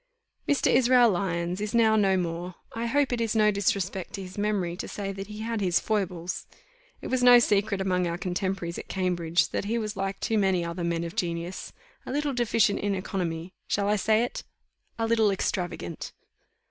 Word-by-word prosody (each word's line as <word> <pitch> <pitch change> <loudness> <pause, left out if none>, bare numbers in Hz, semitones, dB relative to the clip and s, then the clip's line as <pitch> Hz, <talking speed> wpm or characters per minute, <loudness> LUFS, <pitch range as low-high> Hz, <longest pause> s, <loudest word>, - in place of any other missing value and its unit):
Mr. 285 - +3
Israel 245 -2 +5
Lyons 175 0 -1
is 210 +2 -2
now 220 -2 +5
no 195 -3 +3
more. 175 0 -3 0.2
I 230 +1 -2
hope 280 +1 +1
it 240 - -1
is 225 -1 0
no 210 -1 +5
disrespect 195 -2 -1
to 195 - -5
his 185 0 -10
memory 205 -4 -1
to - - -5
say 200 -1 -4
that 195 0 -7
he 210 0 -8
had 225 -1 -2
his 180 -2 +2
foibles. 180 -5 -2 0.5
It - - -6
was 255 -1 +1
no 245 0 +9
secret 205 -3 +2
among 180 -2 +1
our 170 0 -2
contemporaries 180 -1 -3
at - - -9
Cambridge 175 -4 0
that - - -3
he 225 +3 0
was 215 -2 -3
like 195 0 -3
too 220 -1 0
many 190 -3 +2
other 170 +1 -4
men 170 0 -1
of 170 0 -6
genius, 170 +1 -3 0.3
a - - -6
little 290 +1 -1
deficient 230 -4 +2
in 200 -1 0
economy 180 -2 -3
shall 200 0 0
I 210 - +3
say 215 +2 +2
it? 245 - -4 0.5
a 225 - 0
little 225 -2 +3
extravagant. 175 - -3
195 Hz, 195 wpm, -27 LUFS, 180-220 Hz, 0.5 s, no